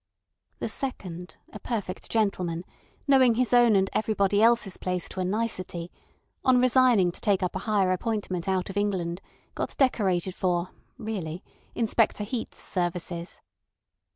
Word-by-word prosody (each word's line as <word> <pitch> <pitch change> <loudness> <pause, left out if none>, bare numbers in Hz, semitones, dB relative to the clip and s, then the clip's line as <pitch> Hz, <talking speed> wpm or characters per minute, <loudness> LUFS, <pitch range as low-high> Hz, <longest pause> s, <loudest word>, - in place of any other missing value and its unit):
The - - -3
second, 185 -8 -5 0.2
a 210 - -7
perfect 205 -6 -4
gentleman, 180 -6 0 0.4
knowing 260 -4 +5
his 250 +1 +1
own 240 -3 +6
and 195 0 +3
everybody 205 -2 +2
else's 230 -4 +3
place 180 -1 -2
to - - -7
a - - +1
nicety, 185 -4 -2 0.5
on 255 -1 +5
resigning 250 -7 +4
to - - -12
take 195 -3 +2
up 180 - -2
a - - -1
higher 195 -3 +3
appointment 185 -2 -2
out 190 0 0
of 200 - -7
England 190 -3 -1 0.3
got - - -4
decorated 190 -9 +2
for 180 -1 0 0.3
(really) 185 -6 -5 0.3
Inspector 225 -2 +2
Heat's 225 +2 -4
services. 175 -1 -3
195 Hz, 140 wpm, -27 LUFS, 180-225 Hz, 0.5 s, own